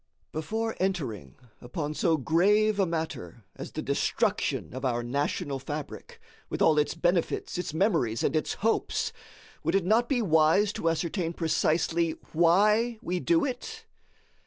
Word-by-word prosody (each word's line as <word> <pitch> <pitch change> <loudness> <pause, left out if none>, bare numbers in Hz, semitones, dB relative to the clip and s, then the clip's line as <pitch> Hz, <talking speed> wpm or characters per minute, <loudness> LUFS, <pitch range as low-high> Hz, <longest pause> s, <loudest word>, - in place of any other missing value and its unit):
Before 220 +9 -3
entering 130 - -2 0.3
upon 145 +5 -4
so 165 +1 +2
grave 205 +8 +3
a 195 - +3
matter 160 - -4
as - - -8
the - - -5
destruction - - -1
of 130 +1 -6
our 120 -2 0
national 140 +3 -2
fabric, 145 +2 -7 0.3
with - - -4
all 155 -2 +4
its 150 - 0
benefits, 175 +3 0
its 180 - -3
memories, 155 - +1
and - - +1
its 155 - 0
hopes, 225 - 0 0.5
would - - +1
it 195 -3 +2
not 225 +5 +3
be 245 -4 +1
wise 165 +4 +3
to 165 - 0
ascertain 165 +1 -2
precisely 165 0 +1 0.2
why 210 +8 +3
we 180 +1 -1
do 330 - +2
it? 450 - -6
165 Hz, 145 wpm, -28 LUFS, 150-205 Hz, 0.5 s, all